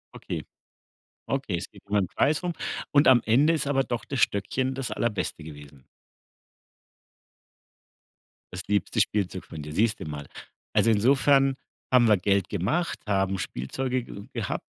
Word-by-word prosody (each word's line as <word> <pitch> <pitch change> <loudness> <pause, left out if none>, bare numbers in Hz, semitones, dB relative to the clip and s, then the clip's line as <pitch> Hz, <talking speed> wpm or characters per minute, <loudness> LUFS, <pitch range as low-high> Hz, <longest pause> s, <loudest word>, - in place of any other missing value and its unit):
Okay, - - -5 0.8
okay, 135 -9 -1
es 85 - -6
geht - - -17
um 100 - -4
den 100 -3 +2
Preis 150 - +1
rum 175 -1 -1 0.4
und 145 0 +4
am 125 -3 +7
Ende 135 +9 +4
ist 145 -4 -1
aber 135 -1 +2
doch 120 -1 -3
das 135 - -4
Stöckchen 130 +7 0
das 135 -2 -4
Allerbeste 105 -8 -2
gewesen. 75 -3 -12 2.7
Das 90 - -4
liebste 105 -2 +1
Spielzeug 95 -3 -1
von 80 -2 -8
dir, 75 +1 -7
siehst 110 +4 +1
du - - -6
mal. 75 -2 -6 0.5
Also, 115 - +4
insofern 135 +4 +4 0.4
haben 125 -2 +6
wir 105 -2 +5
Geld 100 0 +1
gemacht, 110 - -1
haben 95 -1 +1
Spielzeuge 125 - -3
ge 100 -2 -10
gehabt 115 -7 -3
110 Hz, 150 wpm, -26 LUFS, 95-135 Hz, 2.7 s, am